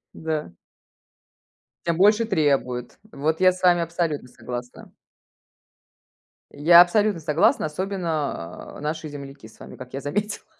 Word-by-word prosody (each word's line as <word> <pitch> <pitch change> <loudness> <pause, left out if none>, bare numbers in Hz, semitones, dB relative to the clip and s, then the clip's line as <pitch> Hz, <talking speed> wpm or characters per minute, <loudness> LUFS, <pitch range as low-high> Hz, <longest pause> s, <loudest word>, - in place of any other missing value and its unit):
Да. 155 - -4 1.3
Тем 170 -1 0
больше 210 +4 +4
требует. 135 - 0
Вот 155 +4 -1
я 185 0 +6
с 185 +1 -10
вами 175 -2 +4
абсолютно 165 -5 -2
согласна. 125 - -8 1.6
Я 170 +4 +7
абсолютно 205 +1 +2
согласна, 155 0 +2
особенно, 155 - -4
э, - - -11
наши 155 +1 -4
земляки 140 -4 -10
с 110 - -20
вами, - - -11
как 125 0 -11
я 135 - -4
заметила. 205 +8 -3
155 Hz, 125 wpm, -23 LUFS, 140-180 Hz, 1.6 s, Я